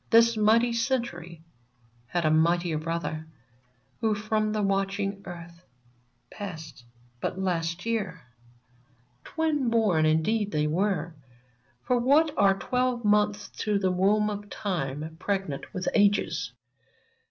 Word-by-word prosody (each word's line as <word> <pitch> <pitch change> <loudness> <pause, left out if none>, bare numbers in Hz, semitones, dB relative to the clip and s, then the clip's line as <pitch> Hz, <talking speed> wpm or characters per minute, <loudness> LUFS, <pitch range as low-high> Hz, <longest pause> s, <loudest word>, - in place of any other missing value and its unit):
This 230 0 +6
mighty 225 +3 +3
Century 230 - -2 0.6
had 170 +5 -1
a 155 - +3
mightier 165 0 +2
brother, 160 -1 -3 0.7
Who 220 -2 +1
from 215 +1 0
the 215 -1 -1
watching 195 0 -1
earth 170 -1 -10 0.7
Passed 160 -10 -8 0.3
but - - -3
last 170 -1 -2
year! 200 -7 -2 1.0
Twin 305 -6 0
born 205 -9 +3
indeed 205 +7 +1 0.2
were 185 -1 0
they 145 -4 -26 0.3
— 120 +1 -39
For 250 -1 +2
what 290 +5 +4
are 195 -1 +4
twelve 250 0 -1
months 210 0 +2
to 210 -1 +1
the 190 -2 +1
womb 205 +3 +2
of 205 0 -7
time 160 -6 -4
Pregnant 195 -7 -3
with 185 -2 -4
ages 205 - +2
195 Hz, 120 wpm, -27 LUFS, 170-215 Hz, 1.0 s, This